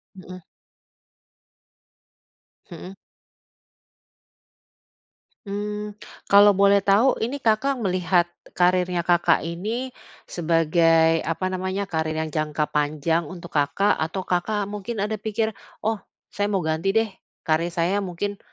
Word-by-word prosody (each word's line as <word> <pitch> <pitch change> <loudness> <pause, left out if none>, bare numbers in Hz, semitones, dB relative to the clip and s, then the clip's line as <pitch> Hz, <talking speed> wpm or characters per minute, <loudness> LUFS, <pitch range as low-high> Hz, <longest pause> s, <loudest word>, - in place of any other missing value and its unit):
Mhm. 185 -1 -11 2.3
Mhm. 175 +3 -9 2.5
Mmm, 210 +1 -4 0.4
kalau 205 0 +7
boleh 200 +1 +5
tau 215 +7 +4
ini 240 +5 -2
Kakak 230 +5 +2
melihat 180 -2 +1 0.2
kariernya 180 -1 +2
Kakak 175 0 +3
ini 215 +10 -4 0.3
sebagai 165 -1 +3
apa 175 +3 -3
namanya, 190 +2 -2
karier 160 -4 -2
yang 160 - -6
jangka 155 0 -1
panjang 150 +2 0
untuk 170 +1 -10
Kakak 145 +9 +2
atau 160 +4 -2
Kakak 195 +4 -1
mungkin 210 +1 -4
ada 215 0 -3
pikir, 220 +1 -1 0.3
"Oh, 220 0 0 0.3
saya 205 0 -1
mau 195 -3 -1
ganti 160 +6 -1
deh, 225 0 +2 0.3
karier 165 +2 0
saya 180 +4 +1
mungkin 200 +1 -4
185 Hz, 110 wpm, -23 LUFS, 165-205 Hz, 2.5 s, kalau